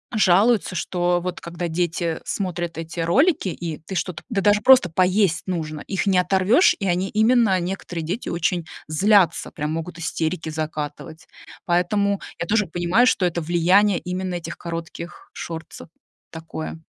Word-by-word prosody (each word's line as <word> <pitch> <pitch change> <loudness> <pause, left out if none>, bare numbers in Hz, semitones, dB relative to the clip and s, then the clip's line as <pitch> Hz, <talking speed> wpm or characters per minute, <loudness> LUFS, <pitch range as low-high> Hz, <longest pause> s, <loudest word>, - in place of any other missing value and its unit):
жалуются, 205 +1 +3
что 175 +1 0
вот 180 0 -5
когда 170 +1 -5
дети 170 0 -1
смотрят 175 -4 -3
эти 165 +1 -6
ролики, 270 - +2
и 165 -2 -5
ты 175 +5 -8
что-то 175 0 -3
Да 210 -5 0
даже 205 +1 +3
просто 255 -8 +6
поесть 185 0 +2
нужно. 155 -4 -3
Их 195 0 -2
не 190 -2 +4
оторвешь, 190 - +4
и 195 - -2
они, 185 +2 0
именно 220 -3 +3
некоторые 175 -2 -4
дети, 185 +9 -4
очень 170 0 -1 0.2
злятся. 190 +4 +3
Прям 150 0 -3
могут 165 +1 -5
истерики 165 0 -2
закатывать. 155 0 -5 0.4
Поэтому 200 +3 +1 0.2
я - - -2
тоже 210 0 +2
понимаю, 175 +8 +2
что 190 - +2
это 175 -1 -1
влияние 175 +4 +3
именно 180 0 -4
этих 170 -1 -6
коротких 170 0 -7
шортсов. 165 0 -8 0.4
Такое 160 0 -7
175 Hz, 150 wpm, -22 LUFS, 165-195 Hz, 0.4 s, просто